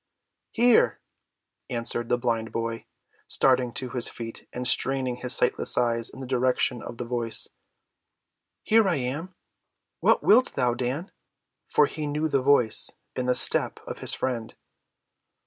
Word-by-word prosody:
"Here!" 240 0 +3 0.7
answered 120 0 -1
the 120 - +3
blind 115 -2 -1
boy, 115 0 -4 0.4
starting 130 -2 +2
to 130 -2 -4
his 125 -1 -1
feet 115 -1 -8
and 125 0 -2
straining 130 -1 +1
his 125 0 0
sightless 125 - +1
eyes 115 -1 +1
in 135 - -11
the - - -5
direction 125 -1 +1
of 120 - -8
the 120 - -4
voice. 115 -1 -2 1.1
"Here 220 -1 +4
am 150 +1 -2
I. 185 - -35 0.6
What - - +3
wilt 250 +5 +4
thou, 125 -2 +2
Dan?" 130 - -3 0.6
For 150 - +4
he 150 +1 -4
knew 150 +2 -1
the 140 -3 +1
voice 130 -5 +3 0.3
and 125 0 -2
the 125 - +3
step - - +1
of - - -7
his - - 0
friend. 120 -4 -3
125 Hz, 145 wpm, -26 LUFS, 120-140 Hz, 1.1 s, Here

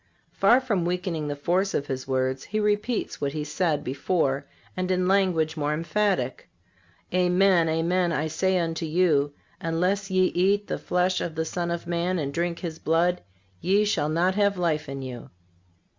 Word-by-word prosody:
Far 245 - +4
from 220 -9 -1
weakening 175 -3 -2
the 145 - -2
force 180 +7 0
of 140 - 0
His 130 -2 -5
words 130 0 -1
He 215 - -2
repeats 210 +3 -1
what 140 -1 -1
He 155 -1 -3
said 150 0 -1
before, 140 0 -1 0.3
and 185 0 -2
in 185 -1 +1
language 180 -5 +2
more 150 -1 -1
emphatic: 165 -5 -1 0.6
"Amen, 180 -1 +3
amen, 170 +2 +1
I 155 -1 0
say 190 +4 +1
unto 165 -1 -2
you, 155 -4 +2 0.3
Unless 180 +5 0
ye 185 0 +3
eat 200 +3 +2
the - - -3
flesh 180 +1 0
of 160 - -4
the 160 0 -1
Son 170 +1 -3
of 170 0 -3
man, 175 +2 -1
and 140 -4 -3
drink 170 +1 -1
His 165 -3 -5
blood, 175 +3 +1 0.4
ye 200 +3 +3
shall 155 -7 0
not 175 +4 +2
have 200 -1 +2
life 160 -5 0
in 135 -1 -5
you." 125 -2 -8
170 Hz, 175 wpm, -26 LUFS, 155-185 Hz, 0.6 s, Far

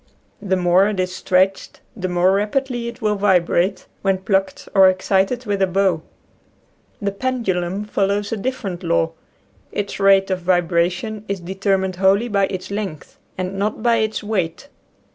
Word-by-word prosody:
The 190 -2 0
more 180 +2 +4
it 210 -3 -2
is 185 0 -1
stretched 185 +1 0 0.2
the 185 -4 -3
more 180 +1 +3
rapidly 235 +4 -1
it 235 - -8
will 210 -1 +2
vibrate, 190 -1 +2 0.2
when 195 -1 +1
plucked 190 0 -1
or 190 -2 +7
excited 195 +6 0
with 200 -2 -1
a 190 - +4
bow. 185 -3 +1 1.0
The 200 -1 -1
pendulum 195 -5 -2
follows 205 0 0
a 225 - -1
different 200 -6 -4
law. 85 - +1 0.6
Its 205 0 -4
rate 195 -1 +4
of 185 - 0
vibration 175 +4 0
is 200 -1 -2
de 175 +2 -6
termined 190 -1 0
wholly 195 +5 +3
by 200 -2 +2
its 185 0 -6
length 200 -7 -5 0.2
and 185 +1 -3
not 210 +2 -2
by 235 -1 +4
its 220 -1 -1
weight. 205 +4 -2
195 Hz, 160 wpm, -20 LUFS, 185-210 Hz, 1.0 s, or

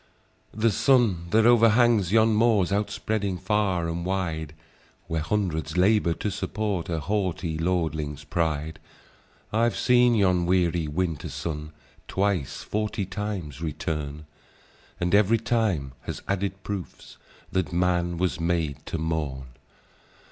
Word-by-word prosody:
"The 110 +1 +2
sun 105 -8 +3
that 110 +4 +4
overhangs 115 -4 +5
yon 110 +1 +5
moors, 105 -4 +3
Out 100 +1 0
spreading 100 -4 -2
far 95 -2 0
and 85 +1 -3
wide, 80 -5 -2 0.5
Where 80 -1 -2
hundreds 90 -2 -1
labour 95 -2 +3
to 105 - -3
support 105 -3 -2
A 80 -2 -1
haughty 90 -3 -1
lordling's 80 -4 -1
pride;— 80 0 -2 0.7
I've 115 +2 +2
seen 125 -1 +4
yon 90 -4 +2
weary 85 -3 +2
winter 80 0 -2
sun 75 -2 -5 0.4
Twice 95 -7 -1
forty 105 -1 -2
times 95 -7 -5
return; 75 -1 -4 0.7
And 90 +1 -1
ev'ry 105 +2 +5
time 110 - 0 0.2
has - - -5
added 95 0 -2
proofs, 100 -4 -7 0.3
That 95 -1 -1
man 85 0 +1
was 90 0 -1
made 80 -4 -1
to - - -3
mourn. 75 -5 -3
90 Hz, 125 wpm, -26 LUFS, 80-105 Hz, 0.7 s, overhangs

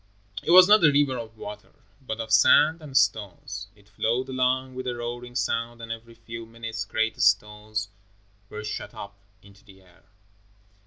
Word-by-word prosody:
It - - -7
was 180 +1 +9
not 210 -2 +6
a 150 - +7
river 140 -2 +2
of 110 -1 -9
water, 105 0 -9 0.3
but 115 -4 -5
of 110 -1 -5
sand 155 +8 +5
and 140 -3 -2
stones. 105 -3 -1
It 100 -1 -24
flowed 115 +6 -1
along 130 0 0
with 130 0 -6
a 125 - -2
roaring 120 +1 -6
sound 120 -2 -2
and 115 0 -8
every 115 0 -8
few 115 0 -9
minutes 115 -1 -6
great 110 +2 -1
stones 105 +1 +1 0.6
were 105 0 -7
shot 105 - -6
up 100 0 -9 0.3
into 100 0 -19
the 95 -3 -18
air. 90 -1 -24
115 Hz, 170 wpm, -25 LUFS, 105-130 Hz, 0.6 s, was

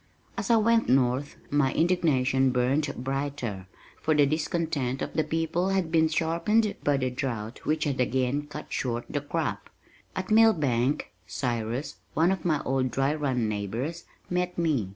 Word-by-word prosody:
As - - -3
I 230 - +6
went 230 +1 +3
north 130 +2 +2 0.2
my 145 -2 +3
indignation 135 -7 +2
burned 130 +4 +1
brighter, 130 -7 -3 0.3
for 155 - +2
the 145 -1 +5
discontent 150 -3 -1
of - - -5
the 155 - +1
people 165 +4 0
had 190 -4 0
been 160 -1 +4
sharpened 170 +7 +1
by 145 -1 +3
the 130 -1 -1
drought 120 -4 -4
which 155 0 +1
had 135 -3 0
again 130 +3 0
cut 150 +1 -8
short 120 -2 -2
the 145 - -2
crop. 145 - -3 0.5
At 185 +2 -4
Millbank, 150 - +3 0.2
Cyrus, 120 +5 -3 0.2
one 165 +4 +4
of 190 -4 -2
my 155 -4 +1
old 130 0 0
Dry 135 +4 +1
Run 130 -7 0
neighbors, 115 - -3 0.2
met 180 0 -1
me. 150 - +1
145 Hz, 155 wpm, -27 LUFS, 125-165 Hz, 0.5 s, I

